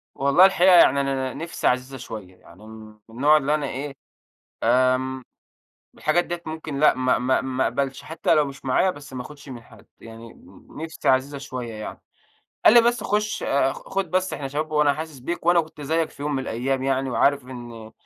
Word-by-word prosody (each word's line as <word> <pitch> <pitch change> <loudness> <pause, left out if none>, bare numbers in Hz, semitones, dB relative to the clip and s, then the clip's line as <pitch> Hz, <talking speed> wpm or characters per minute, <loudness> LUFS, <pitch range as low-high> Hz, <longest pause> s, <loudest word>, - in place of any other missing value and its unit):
والله 140 +7 +5
الحقيقة 185 -1 +5
يعني 140 -5 +6
أنا 135 -1 -2
نِفْسي 165 +4 -3
عزيزة 130 +2 -1
شوية، 105 -7 -9
يعني 90 +4 -17
م - - -12 0.4
من 115 - -14
النوع 150 +4 +5
اللي 150 +1 +1
أنا 150 -2 -2
إيه، 140 +1 -5 0.7
آمم، 130 +2 +2 0.7
الحاجات 170 +3 +1
ديّة 175 0 -5
ممكن 155 -3 -5
لأ 150 - +5
ما 130 0 +1
ما 125 +2 +1
ما 130 0 -1
أقبلش، 135 +3 -2
حتّى 160 +1 0
لو 150 -1 +3
مش 135 0 -10
معايا 130 +8 +2
بس 140 -4 -12
ما 125 - -4
أخُدش 145 +1 -12
من 120 -2 -8
حد. 110 -4 -18
يعني 115 0 -12 0.4
نِفْسي 160 +1 -4
عزيزة 135 +2 +1
شوية 125 -4 -6
يعني. 110 0 -8 0.6
قال 220 - +8
لي: 235 - +9
"بس 240 +1 +1
خُش 210 +1 -1
أ 135 -1 +1
خُد 195 -4 -4
بس 185 0 0
إحنا 135 -2 -4
شباب 155 +3 -3
وأنا 150 -2 +3
حاسس 155 -2 -7
بيك 170 +6 -5
وأنا 175 -1 +5
كنت 160 -1 -11
زيّك 160 +3 -1
في - - -11
يوم 150 0 -2
من 130 - -1
الأيام 130 +2 -2
يعني 135 -1 0
وعارف 140 +2 +2
إن 120 -3 -10
135 Hz, 195 wpm, -23 LUFS, 130-155 Hz, 0.7 s, لي